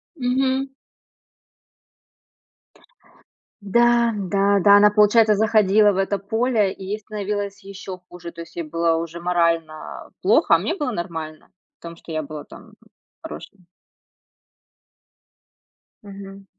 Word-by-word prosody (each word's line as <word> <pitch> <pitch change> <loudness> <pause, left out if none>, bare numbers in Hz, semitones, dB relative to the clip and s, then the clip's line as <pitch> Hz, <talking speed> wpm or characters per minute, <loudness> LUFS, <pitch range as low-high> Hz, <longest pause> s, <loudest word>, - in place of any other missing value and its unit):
Мгм. 265 0 0 2.9
Да, 235 +3 +3
да, 200 0 +1
да, 200 +2 +6
она, 210 0 +6
получается, 210 +1 +4
заходила 215 -1 +4
в 195 - -4
это 195 +1 0
поле, 220 0 0
и 190 - -10
ей 210 +2 -4
становилось 205 -1 -5
ещё 195 -1 -9
хуже, 175 -1 -10
то 170 - -10
есть 165 - -13
ей 170 - -3
было 165 +1 0
уже 165 +1 -5
морально 170 -3 -2
плохо, - - +4
а - - +4
мне - - -2
было 290 -9 -3
нормально 165 -5 -6 0.3
в - - -70
том, 170 0 -9
что 165 - -10
я 155 -1 -2
была 150 +1 -8
там - - -15 0.5
хорошей. 80 - -10 2.4
Мгм. 195 -1 -11
195 Hz, 125 wpm, -22 LUFS, 170-215 Hz, 2.9 s, да